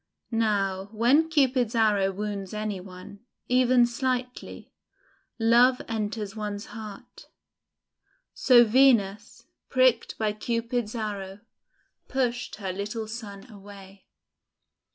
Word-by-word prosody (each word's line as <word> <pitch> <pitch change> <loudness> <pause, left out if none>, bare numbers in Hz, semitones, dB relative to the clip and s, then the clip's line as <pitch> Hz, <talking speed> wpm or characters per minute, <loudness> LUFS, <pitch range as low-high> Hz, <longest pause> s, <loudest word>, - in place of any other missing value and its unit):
Now 200 -4 0
when 260 +9 +3
Cupid's 260 -6 +1
arrow 205 -4 +2
wounds 200 0 -5
any 210 -2 -3
one, 185 +2 -12 0.3
even 250 -1 +4
slightly, 250 +1 -4 0.6
love 240 +2 +4
enters 215 -2 -4
one's 210 -1 -5
heart. 215 -3 -10 1.1
So 245 -2 +6
Venus, 225 -4 +2 0.2
pricked 255 -3 +2
by 215 -1 -1
Cupid's 230 +1 -3
arrow, 205 -3 -5 0.7
pushed 245 -2 -2
her 190 -3 -5
little 210 +3 -5
son 215 -2 -9
away. 200 -2 -14
220 Hz, 95 wpm, -26 LUFS, 200-245 Hz, 1.1 s, So